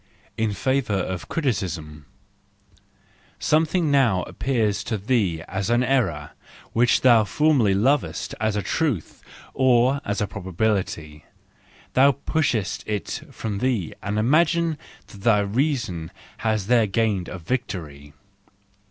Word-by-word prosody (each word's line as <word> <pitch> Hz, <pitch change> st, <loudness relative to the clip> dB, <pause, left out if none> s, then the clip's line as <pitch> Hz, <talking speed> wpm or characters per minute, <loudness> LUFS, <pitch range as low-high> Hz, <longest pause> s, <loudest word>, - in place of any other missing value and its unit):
In 110 Hz, -1 st, 0 dB
Favour 130 Hz, -2 st, 0 dB
of 95 Hz, -1 st, -3 dB
Criticism 85 Hz, -, -3 dB, 1.3 s
,.—Something 160 Hz, +1 st, +1 dB
now 120 Hz, -10 st, +3 dB
appears 110 Hz, -6 st, -1 dB
to 110 Hz, -, -2 dB
thee 100 Hz, -7 st, 0 dB
as 95 Hz, 0 st, -3 dB
an 120 Hz, +1 st, +3 dB
error 95 Hz, -, 0 dB, 0.4 s
which 120 Hz, +1 st, +3 dB
thou 120 Hz, -4 st, +6 dB
formerly 115 Hz, -2 st, +2 dB
lovedst 135 Hz, +8 st, 0 dB
as 110 Hz, -1 st, +1 dB
a 105 Hz, -, -1 dB
truth, 140 Hz, -, -2 dB, 0.3 s
or 130 Hz, +1 st, +3 dB
as 100 Hz, 0 st, -2 dB
a 105 Hz, -, +1 dB
probability: 95 Hz, -5 st, -3 dB, 0.7 s
thou 135 Hz, +2 st, +5 dB
pushest 135 Hz, -7 st, -1 dB
it 105 Hz, -4 st, -3 dB
from 105 Hz, -3 st, -4 dB
thee 115 Hz, -10 st, -1 dB
and 105 Hz, +1 st, -3 dB
imaginest 155 Hz, +7 st, +2 dB, 0.3 s
that 100 Hz, -, -14 dB
thy 110 Hz, -1 st, +4 dB
reason 110 Hz, -, -1 dB, 0.3 s
has 110 Hz, -3 st, 0 dB
there 115 Hz, -1 st, +3 dB
gained 100 Hz, -3 st, 0 dB
a 90 Hz, -, -6 dB
victory. 80 Hz, -, -5 dB
110 Hz, 120 wpm, -23 LUFS, 95-130 Hz, 1.3 s, thou